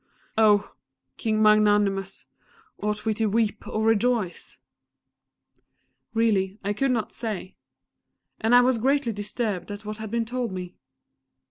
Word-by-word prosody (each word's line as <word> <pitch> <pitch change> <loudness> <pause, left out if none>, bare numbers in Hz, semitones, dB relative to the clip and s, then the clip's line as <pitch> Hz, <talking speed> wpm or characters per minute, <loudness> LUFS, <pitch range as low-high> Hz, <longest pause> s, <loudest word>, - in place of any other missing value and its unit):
Oh! 210 -2 +3 0.4
King 215 -1 0
Magnanimous, 205 -2 +3 0.5
ought 210 +1 -2
we 220 - +2
to 220 +1 0
weep 215 +1 0
or 215 - -2
rejoice?" 225 -3 0 1.6
Really, 205 -4 +1
I 200 +1 -1
could 270 +6 0
not 235 -4 -1
say. 210 -5 -5 0.8
And 225 +2 +3
I 245 - +8
was 250 -1 +2
greatly 265 -1 +1
disturbed 205 -2 -3
at 205 +1 -7
what 215 0 -5
had 220 -1 -5
been 230 +1 -1
told 245 -2 -3
me. 180 -1 -6
215 Hz, 130 wpm, -25 LUFS, 205-230 Hz, 1.6 s, I